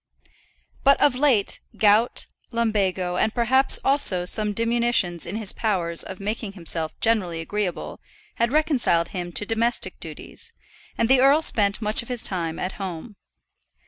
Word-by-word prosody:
But 275 0 +5
of 290 - +4
late 255 -6 +2 0.2
gout, 215 +3 +2 0.2
lumbago, 195 -6 -1
and 220 - 0
perhaps 260 +3 +3
also 235 -11 +2
some 210 +3 +1
diminution 230 -5 +1
in 190 - -5
his 215 -3 -1
powers 175 -7 0
of 190 - -6
making 210 0 -4
himself 165 -3 -2
generally 195 -8 +1
agreeable, 185 +1 -4 0.4
had 235 +1 +1
reconciled 270 - +1
him 175 -2 -5
to 210 - -2
domestic 230 +2 -1
duties, 465 0 -9 0.4
and 230 - +1
the 260 +1 +4
earl 280 +4 +5
spent 205 -3 +1
much 210 +4 +2
of 235 - -12
his 245 -2 -1
time 165 -4 -2
at 185 - -3
home. 190 +3 -6
215 Hz, 145 wpm, -23 LUFS, 185-240 Hz, 0.4 s, But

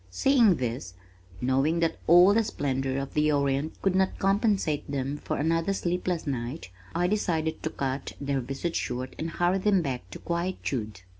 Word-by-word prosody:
Seeing 225 - +4
this, 115 - -4 0.5
knowing 135 +6 +2
that 165 - 0
all 175 +4 +8
the 225 +1 +3
splendors 135 -7 -1
of 135 - -9
the 150 0 +2
Orient 140 +1 0
could 195 - +3
not 190 0 +1
compensate 195 -7 +1
them 140 0 -2
for - - -3
another 165 +5 +1
sleepless 180 -2 -1
night, 125 - -4 0.2
I 175 - +2
decided 175 -5 0
to 160 - -2
cut 135 -2 -3
their 140 -1 -1
visit 135 +7 -4
short 125 +1 -3
and 160 - -2
hurry 175 +3 +1
them 195 -2 +3
back 125 - -4
to - - -8
quietude. 140 - -3
155 Hz, 165 wpm, -27 LUFS, 135-180 Hz, 0.5 s, all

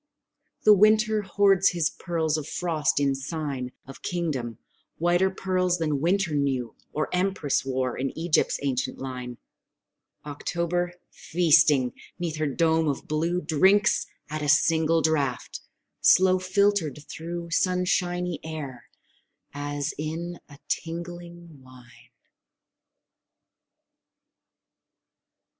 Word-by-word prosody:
The 215 - +8
winter 215 +1 +4
hoards 195 -1 +3
his 165 -4 0
pearls 160 -3 -1
of 155 -2 -4
frost 160 -5 0
in 140 -1 +2
sign 135 -2 -4
Of 135 0 -12
kingdom: 140 -10 -3 0.4
whiter 175 +3 +2
pearls 185 -1 0
than 150 -4 -1
winter 175 0 +1
knew, 135 -4 -1 0.2
Or 155 - -1
Empress 180 -6 0
wore, 130 -1 -2
in 135 +1 -2
Egypt's 165 0 +1
ancient 130 -1 -1
line, 125 -2 -6 0.9
October, 170 +4 -2 0.2
feasting 155 -6 +3 0.2
'neath 170 -3 -3
her 155 -1 0
dome 160 +3 +2
of 140 -2 -3
blue, 165 +4 0
Drinks 190 +8 +3 0.2
at 155 +1 -4
a 150 - -1
single 160 +2 +3
draught, 145 -5 -1 0.4
slow 185 0 +5
filtered 185 -5 +1
through 170 +1 -6
Sunshiny 180 -1 0
air, 150 -6 -7 0.7
as 145 +1 -3
in 165 +3 -4
a 140 - -13
tingling 170 -2 -6
wine! 120 -2 -17
160 Hz, 105 wpm, -26 LUFS, 145-175 Hz, 0.9 s, The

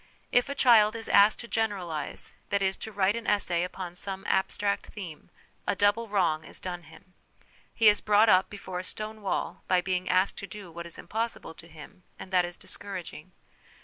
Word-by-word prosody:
If 245 +2 +3
a 280 - -3
child 225 -5 +6
is 225 0 -5
asked 205 +2 +6
to 235 - -9
generalise, 195 -10 -2 0.2
that 200 0 +1
is, 190 0 +1
to 220 - -7
write 200 0 +2
an 230 -1 -5
essay 180 -4 +1
upon 180 -1 -6
some 195 +1 -5
abstract 200 +1 0
theme, 175 -8 -9 0.4
a - - +1
double 205 +4 +2
wrong 175 -7 +1
is - - -6
done 180 -1 -5
him. 165 +3 -17 0.6
He 225 - +3
is 210 -1 +6
brought 210 +1 +5
up 185 -2 +5
before 190 -3 -6
a - - -5
stone 215 +3 -6
wall 195 - -2
by 185 - +4
being 180 0 -1
asked 185 +2 +2
to 200 - -6
do 195 -2 -10
what 170 +1 -7
is 170 - -7
impossible 225 -4 -4
to 165 - -14
him, 165 +4 -13 0.2
and 190 - -10
that 180 -1 +4
is 175 0 -7
discouraging. 185 -4 -7
195 Hz, 195 wpm, -28 LUFS, 180-210 Hz, 0.6 s, child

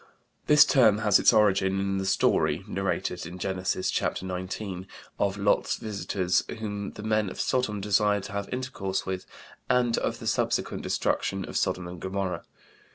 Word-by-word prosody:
This 150 0 +8
term 110 -7 +5
has 105 -2 +4
its - - +6
origin 95 -2 +3
in 95 0 -1
the 95 - -2
story 85 -2 +2
(narrated 95 -3 -2
in 90 +2 -8
Genesis, 95 0 -1
ch. - - +1
xix) 95 +1 -3 0.6
of 100 0 +1
Lot's 100 0 +2
visitors 100 -4 -1
whom 105 -2 -4
the 105 - -9
men 110 -2 +1
of - - -9
Sodom 125 -5 0
desired 105 0 +2
to - - -7
have 100 0 -4
intercourse 125 -7 -3
with, 95 -1 -4 0.4
and 120 -2 +2
of - - -2
the - - -9
subsequent - - 0
destruction 95 -1 -1
of - - -9
Sodom 90 -1 0
and 90 0 -8
Gomorrah. 95 0 -3
100 Hz, 160 wpm, -27 LUFS, 95-105 Hz, 0.6 s, This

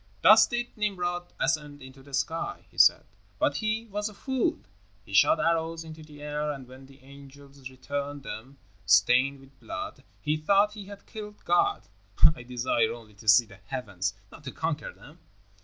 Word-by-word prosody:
"Thus - - +8
did 240 -1 -3
Nimrod 175 -5 -2
ascend 150 -2 -1
into 130 0 -13
the 135 0 -6
sky," 165 +4 -2
he - - -23
said, - - +6 0.3
"but 140 +6 +1
he 220 +1 -1
was 210 0 -3
a 210 - -14
fool. 265 +2 -1 0.5
He 100 - -12
shot - - +5
arrows 165 0 0
into 160 0 -10
the 150 -1 -13
air, 150 0 -2
and 135 -3 -8
when 130 +1 -13
the 135 0 -19
angels 140 0 -13
returned 140 +2 -5
them 135 +3 -8 0.3
stained 125 +9 +4
with 135 0 -20
blood, - - -7 0.2
he 150 +1 0
thought 200 +7 +3
he 210 -2 -8
had 200 0 -11
killed 210 -1 -10
God. 405 0 +2 0.5
I - - -10
desire 120 -2 0
only 115 -3 -10
to 110 +2 -16
see 105 +4 +7
the 100 -3 -15
heavens, 95 -5 -3 0.2
not 150 - -13
to 130 - -5
conquer 160 -2 -3
them." 155 +4 -16
145 Hz, 175 wpm, -28 LUFS, 130-175 Hz, 0.5 s, Thus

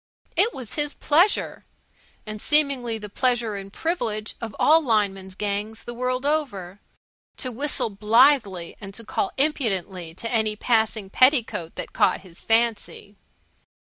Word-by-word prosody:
It 395 +7 +3
was 250 - -7
his 295 -1 -1
pleasure 345 +8 +2 0.6
and 215 -1 -7
seemingly 280 -6 +1
the 210 -1 -8
pleasure 240 0 0
and 195 0 -8
privilege 220 - -3
of 225 -4 -6
all 320 +2 +5
lineman's 200 -7 0
gangs 210 +2 -3
the 240 - -7
world 255 +2 -2
over 205 - -2 0.6
to 255 - -3
whistle 260 -2 -2
blithely 210 -3 +3
and 195 -1 -8
to 230 - -7
call 385 - -2
impudently 195 - -1
to 230 +4 -5
any 220 -2 +1
passing 220 -3 0
petticoat 230 - +3
that - - -6
caught - - +2
his 180 -2 -13
fancy. 225 -2 0
225 Hz, 135 wpm, -24 LUFS, 205-270 Hz, 0.6 s, all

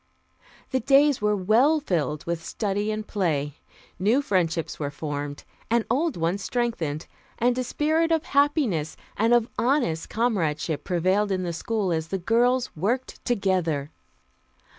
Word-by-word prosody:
The 260 - +1
days 275 +2 +4
were 210 0 +2
well 230 +11 +3
filled 160 - -2
with 170 -1 -3
study 205 +1 -2
and 215 0 -3
play. 150 -9 -1 0.4
New 225 +9 +3
friendships 170 - 0
were 145 -2 -2
formed 145 -1 -5 0.3
and 235 0 +2
old 295 - +1
ones 170 +4 -1
strengthened, 185 -11 -2 0.3
and 245 +1 +2
a 255 - -1
spirit 315 +5 +1
of 320 -1 +2
happiness 280 - +1 0.2
and 225 +2 +2
of 240 -1 +4
honest 240 - +1
comradeship 165 -10 -1
prevailed 190 +3 +1
in 185 -1 0
the 170 -1 -3
school 200 +2 -1
as 160 -1 -2
the 195 - -2
girls 240 +6 +1
worked 235 +11 -2
together. 180 - 0
205 Hz, 140 wpm, -25 LUFS, 165-245 Hz, 0.4 s, days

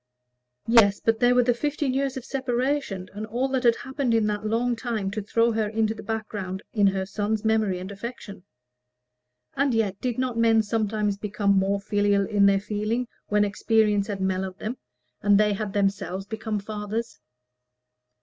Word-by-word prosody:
Yes; 220 -3 +5
but 225 0 +1
there 245 0 +4
were 250 - +5
the 245 0 +3
fifteen 290 +1 -1
years 270 0 -1
of 255 - -7
separation, 255 -6 -1
and 215 +2 -5
all 245 +5 -1
that 260 -1 0
had 235 -2 +4
happened 265 -2 -1
in 225 -1 +3
that 210 0 -2
long 235 +2 +1
time 225 -5 -3
to 215 +2 -3
throw 230 +3 +2
her 220 -1 0
into 220 0 0
the 215 - -9
background 210 -4 -4
of 205 -3 +4
her 190 -1 0
son's 210 +2 -2
memory 220 -4 +2
and 185 +2 -7
affection. 200 -2 -8 1.1
And 275 -3 +1
yet 205 -4 0
did 245 -2 -2
not 255 -2 -1
men 225 -1 +4
sometimes 210 -1 -1
become 205 -1 0
more 195 +1 +2
filial 205 0 +1
in 200 -1 +3
their 195 0 +4
feeling 215 +4 -2 0.2
when 210 0 +3
experience 210 0 +2
had 200 -3 -4
mellowed 190 0 -1
them, 230 +5 -4 0.4
and 205 0 +5
they 210 -1 +3
had 200 -1 -4
themselves 195 -2 -1
become 220 0 -3
fathers? 210 +2 -5
215 Hz, 175 wpm, -25 LUFS, 200-235 Hz, 1.1 s, Yes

